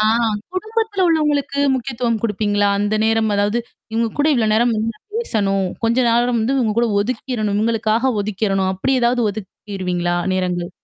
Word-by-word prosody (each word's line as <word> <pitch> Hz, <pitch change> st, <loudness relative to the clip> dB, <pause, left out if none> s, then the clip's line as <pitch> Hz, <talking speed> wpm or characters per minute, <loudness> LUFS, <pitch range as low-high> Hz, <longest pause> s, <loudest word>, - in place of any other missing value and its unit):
ஆ. -, -, +3 dB, 0.5 s
குடும்பத்துல 435 Hz, 0 st, -1 dB
உள்ளவங்களுக்கு 295 Hz, -3 st, +1 dB, 0.2 s
முக்கியத்துவம் 240 Hz, -3 st, -2 dB
குடுப்பீங்களா? 205 Hz, -2 st, +1 dB
அந்த 205 Hz, +1 st, 0 dB
நேரம் 220 Hz, -1 st, +2 dB
அதாவது 205 Hz, +3 st, +1 dB, 0.3 s
இவங்க 230 Hz, +1 st, +1 dB
கூட 290 Hz, -, +3 dB
இவ்வளோ 225 Hz, -4 st, +1 dB
நேரம் 235 Hz, +1 st, +3 dB
வந்து 220 Hz, +1 st, -1 dB, 0.2 s
பேசணும். 200 Hz, -, 0 dB, 0.2 s
கொஞ்ச 230 Hz, +1 st, +2 dB
நேரம் 240 Hz, +1 st, +2 dB
வந்து 240 Hz, +5 st, 0 dB
இங்க 215 Hz, -2 st, 0 dB
கூட 240 Hz, -, +3 dB
ஒதுக்கிறணும். 220 Hz, -2 st, -2 dB
இங்களுக்காக 230 Hz, +2 st, +1 dB
ஒதுக்கிறணும். 195 Hz, -2 st, 0 dB
அப்படி 230 Hz, +9 st, 0 dB
ஏதாவது 240 Hz, 0 st, +2 dB
ஒதுக்கிருவீங்களா 185 Hz, -3 st, -4 dB, 0.2 s
நேரங்கள்? 180 Hz, -1 st, -2 dB
225 Hz, 145 wpm, -19 LUFS, 205-245 Hz, 0.5 s, ஆ